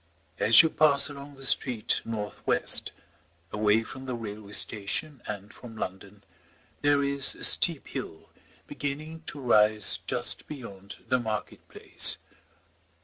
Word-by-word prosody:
As 110 Hz, +7 st, +7 dB
you 160 Hz, -, 0 dB
pass 145 Hz, -2 st, +3 dB
along 140 Hz, 0 st, -11 dB
the 135 Hz, 0 st, -8 dB
street 125 Hz, -4 st, +1 dB
north 105 Hz, -2 st, -6 dB
west, -, -, +2 dB, 0.6 s
away 105 Hz, +1 st, +1 dB
from 130 Hz, +3 st, -10 dB
the 125 Hz, -, -3 dB
railway 105 Hz, -2 st, -9 dB
station 115 Hz, +9 st, -1 dB
and 105 Hz, 0 st, -7 dB
from 115 Hz, -3 st, -12 dB
London, 100 Hz, +1 st, -8 dB, 0.6 s
there 145 Hz, -1 st, +2 dB
is 140 Hz, -1 st, +2 dB
a -, -, -12 dB
steep -, -, +4 dB
hill, -, -, -8 dB, 0.3 s
beginning 155 Hz, +3 st, -6 dB
to 145 Hz, -, -6 dB
rise 110 Hz, -4 st, +4 dB
just -, -, -2 dB
beyond 100 Hz, -8 st, -11 dB
the 130 Hz, -, +1 dB
market 110 Hz, -3 st, -6 dB
place. -, -, +3 dB
115 Hz, 135 wpm, -27 LUFS, 105-140 Hz, 0.6 s, As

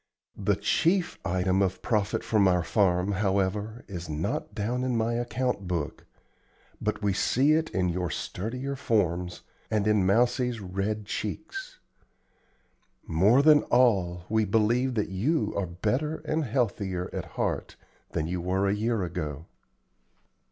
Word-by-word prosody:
The -, -, +2 dB
chief 180 Hz, +2 st, +1 dB
item 95 Hz, +1 st, +1 dB
of 95 Hz, -1 st, -1 dB
profit 105 Hz, -4 st, 0 dB
from 105 Hz, -3 st, +3 dB
our 90 Hz, -2 st, +3 dB
farm, 90 Hz, 0 st, +2 dB
however, 100 Hz, +3 st, -1 dB
is 85 Hz, -3 st, -6 dB
not 105 Hz, -, -3 dB
down 120 Hz, +4 st, -1 dB
in 130 Hz, -1 st, 0 dB
my 115 Hz, +1 st, +1 dB
account 120 Hz, -3 st, -1 dB
book, 85 Hz, -5 st, -3 dB, 0.7 s
but 105 Hz, 0 st, -2 dB
we 100 Hz, -1 st, +2 dB
see 130 Hz, +9 st, +2 dB
it 160 Hz, +1 st, +2 dB
in 90 Hz, -1 st, 0 dB
your 90 Hz, 0 st, -1 dB
sturdier 125 Hz, -, -4 dB
forms 90 Hz, -9 st, 0 dB, 0.3 s
and 105 Hz, -2 st, +1 dB
in 105 Hz, -2 st, +3 dB
Mousie's 120 Hz, +4 st, +2 dB
red 100 Hz, +2 st, -3 dB
cheeks. 160 Hz, -, -5 dB, 1.3 s
More 100 Hz, -, +4 dB
than 150 Hz, -1 st, +7 dB
all, 95 Hz, -9 st, +3 dB
we 110 Hz, 0 st, +2 dB
believe 115 Hz, +5 st, +2 dB
that 105 Hz, -, 0 dB
you 125 Hz, -, 0 dB
are 100 Hz, -2 st, -1 dB
better 110 Hz, -, -2 dB
and 155 Hz, -1 st, 0 dB
healthier 100 Hz, -7 st, -1 dB
at -, -, -3 dB
heart -, -, -2 dB, 0.4 s
than 80 Hz, -, 0 dB
you 90 Hz, +2 st, -2 dB
were 95 Hz, +3 st, +1 dB
a 100 Hz, -, +2 dB
year 110 Hz, 0 st, 0 dB
ago. 80 Hz, -4 st, -4 dB
105 Hz, 140 wpm, -27 LUFS, 90-120 Hz, 1.3 s, than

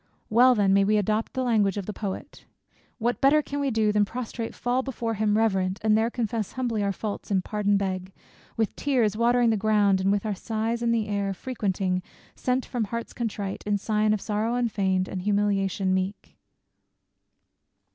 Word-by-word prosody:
Well 250 Hz, +3 st, +6 dB
then 200 Hz, -3 st, +3 dB
may 200 Hz, 0 st, +5 dB
we 210 Hz, +2 st, +3 dB
adopt 215 Hz, +2 st, 0 dB
the 260 Hz, -, -1 dB
language 210 Hz, -5 st, +2 dB
of 200 Hz, -, -3 dB
the 210 Hz, -, -5 dB
poet: 200 Hz, -3 st, -6 dB, 0.5 s
What 240 Hz, +1 st, -1 dB
better 295 Hz, +3 st, +5 dB
can 285 Hz, 0 st, -4 dB
we 280 Hz, -1 st, 0 dB
do, 220 Hz, -3 st, +2 dB
than 210 Hz, 0 st, +3 dB
prostrate 230 Hz, +1 st, -5 dB
fall 245 Hz, +1 st, 0 dB
Before 240 Hz, -4 st, -3 dB
him 210 Hz, 0 st, +1 dB
reverent; 190 Hz, -4 st, +1 dB
and 215 Hz, -1 st, +4 dB
there 220 Hz, +1 st, +2 dB
confess 225 Hz, -3 st, -3 dB
Humbly 240 Hz, -4 st, -1 dB
our 200 Hz, 0 st, +1 dB
faults, 205 Hz, +1 st, -5 dB
and 190 Hz, -3 st, +1 dB
pardon 205 Hz, 0 st, +1 dB
beg; 185 Hz, -1 st, -3 dB, 0.5 s
with 220 Hz, -2 st, 0 dB
tears 245 Hz, -7 st, +1 dB
Watering 235 Hz, +1 st, +3 dB
the 220 Hz, -, +1 dB
ground, 205 Hz, -2 st, +3 dB
and 195 Hz, +1 st, +2 dB
with 205 Hz, +1 st, 0 dB
our 215 Hz, -, 0 dB
sighs 225 Hz, +3 st, -2 dB
the 230 Hz, -2 st, +1 dB
air 200 Hz, -1 st, -1 dB
Frequenting, 190 Hz, -5 st, -2 dB, 0.3 s
sent 255 Hz, 0 st, -1 dB
from 240 Hz, -4 st, -2 dB
hearts 230 Hz, +3 st, -5 dB
contrite, 205 Hz, -4 st, -4 dB
in 205 Hz, -1 st, +2 dB
sign 215 Hz, +1 st, +1 dB
Of 215 Hz, -2 st, 0 dB
sorrow 220 Hz, +2 st, -1 dB
unfeign'd, 195 Hz, -6 st, 0 dB
and 185 Hz, -, -4 dB
humiliation 200 Hz, -1 st, +1 dB
meek? 190 Hz, +2 st, -3 dB
215 Hz, 180 wpm, -26 LUFS, 200-235 Hz, 0.5 s, Well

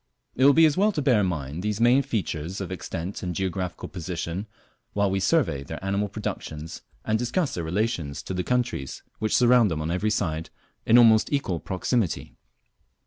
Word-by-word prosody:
It 130 Hz, -, +1 dB
will 140 Hz, -, +8 dB
be 165 Hz, +2 st, +6 dB
as 155 Hz, -, +3 dB
well 210 Hz, +3 st, +4 dB
to 150 Hz, -, -1 dB
bear 125 Hz, -6 st, +4 dB
in 100 Hz, -, +2 dB
mind 75 Hz, -2 st, -4 dB
these 105 Hz, +1 st, -2 dB
main 120 Hz, +4 st, +5 dB
features 95 Hz, -, -3 dB
of 95 Hz, -2 st, -5 dB
extent 90 Hz, 0 st, -5 dB
and 90 Hz, -2 st, -3 dB
geographical 95 Hz, -1 st, -3 dB
position, 90 Hz, +2 st, -5 dB, 0.5 s
while 100 Hz, -1 st, +1 dB
we 95 Hz, -, 0 dB
survey 95 Hz, -, +1 dB
their 75 Hz, +6 st, -7 dB
animal 100 Hz, +1 st, 0 dB
productions 80 Hz, -6 st, -6 dB, 0.2 s
and 110 Hz, 0 st, +1 dB
discuss 130 Hz, +7 st, -1 dB
their 85 Hz, -, -3 dB
relations 80 Hz, -5 st, -2 dB
to -, -, -5 dB
the 90 Hz, 0 st, -1 dB
countries 125 Hz, -, -2 dB, 0.2 s
which 110 Hz, -, +1 dB
surround 120 Hz, -3 st, +5 dB
them 80 Hz, -3 st, -2 dB
on 80 Hz, +2 st, -2 dB
every 90 Hz, +5 st, 0 dB
side 80 Hz, -6 st, -1 dB, 0.4 s
in 115 Hz, -, +7 dB
almost 110 Hz, -2 st, +6 dB
equal 115 Hz, -, -1 dB
proximity. 95 Hz, +2 st, -1 dB
100 Hz, 185 wpm, -25 LUFS, 85-120 Hz, 0.5 s, will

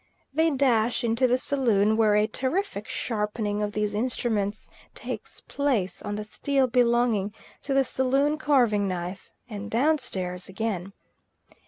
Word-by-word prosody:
They 320 Hz, +3 st, +3 dB
dash 245 Hz, -5 st, +2 dB
into 235 Hz, +2 st, +2 dB
the 250 Hz, +1 st, +3 dB
saloon, 225 Hz, -6 st, +2 dB
where 215 Hz, -2 st, +4 dB
a 210 Hz, 0 st, +4 dB
terrific 260 Hz, -, -2 dB
sharpening 210 Hz, -2 st, -2 dB
of 205 Hz, 0 st, -2 dB
these 210 Hz, -1 st, -1 dB
instruments 215 Hz, -2 st, -1 dB, 0.3 s
takes -, -, -7 dB
place 240 Hz, -11 st, -1 dB
on 205 Hz, -, -4 dB
the 210 Hz, -, -4 dB
steel 270 Hz, +5 st, 0 dB
belonging 235 Hz, -4 st, +2 dB, 0.3 s
to 275 Hz, -, -2 dB
the 275 Hz, -, +5 dB
saloon 270 Hz, +4 st, +1 dB
carving 240 Hz, -9 st, +3 dB
knife, 180 Hz, +1 st, -5 dB, 0.2 s
and 210 Hz, -2 st, -6 dB
down 295 Hz, +8 st, +2 dB
stairs 180 Hz, -7 st, -4 dB
again. 195 Hz, -2 st, -3 dB
225 Hz, 140 wpm, -26 LUFS, 205-260 Hz, 0.3 s, the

